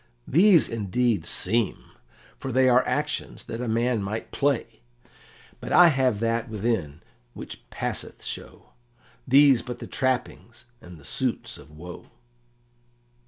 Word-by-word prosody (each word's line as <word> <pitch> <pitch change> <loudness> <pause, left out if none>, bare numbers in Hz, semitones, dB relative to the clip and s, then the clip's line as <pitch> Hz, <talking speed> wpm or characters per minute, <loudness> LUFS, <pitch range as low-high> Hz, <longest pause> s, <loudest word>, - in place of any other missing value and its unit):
"These 175 +2 +5
indeed 110 -3 -1
'seem,' 110 +2 +1 0.5
for 135 - -5
they 130 +1 +3
are 125 0 +5
actions 150 0 -2
that 115 - -6
a 125 - -3
man 115 0 +1
might 105 +3 -5
play. 125 -5 -1 0.8
But - - -7
I 175 -1 +8
have 130 -7 +1
that 115 0 -1
within 95 -8 -2 0.3
which - - -10
passeth - - -5
show; - - -8 0.6
these 135 -1 +6
but 125 -1 -7
the - - -8
trappings 125 -2 -3 0.2
and 90 -1 -12
the 70 - -16
suits - - -3
of - - -15
woe." 85 +4 -11
120 Hz, 130 wpm, -25 LUFS, 105-130 Hz, 0.8 s, I